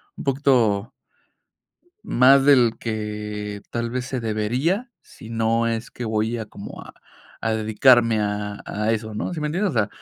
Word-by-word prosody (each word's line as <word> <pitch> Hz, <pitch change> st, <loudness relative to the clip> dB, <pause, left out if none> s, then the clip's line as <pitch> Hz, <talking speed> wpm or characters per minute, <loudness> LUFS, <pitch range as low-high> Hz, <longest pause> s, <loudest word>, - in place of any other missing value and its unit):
un -, -, -8 dB
poquito 130 Hz, -7 st, +2 dB, 1.1 s
más 135 Hz, +2 st, +5 dB
del 125 Hz, -5 st, +5 dB
que 105 Hz, -2 st, -5 dB
tal 120 Hz, 0 st, -2 dB
vez 125 Hz, 0 st, -3 dB
se 130 Hz, -1 st, -4 dB
debería, 125 Hz, -, -1 dB
si 110 Hz, -, -14 dB
no 115 Hz, 0 st, +1 dB
es 115 Hz, +1 st, -3 dB
que 125 Hz, -, -7 dB
voy 110 Hz, +1 st, -1 dB
a, 110 Hz, -, -4 dB
como 100 Hz, -, -10 dB
a -, -, -12 dB, 0.5 s
a 115 Hz, -, 0 dB
dedicarme 110 Hz, +1 st, +4 dB
a 105 Hz, 0 st, -3 dB
a 105 Hz, +2 st, -1 dB
eso, 110 Hz, -1 st, -3 dB
¿no? 105 Hz, -, -3 dB
¿Sí 155 Hz, -, -5 dB
me 150 Hz, -, -1 dB
entiendes? 185 Hz, +6 st, 0 dB
O -, -, -7 dB
sea, 110 Hz, -2 st, +2 dB
115 Hz, 170 wpm, -23 LUFS, 105-130 Hz, 1.1 s, más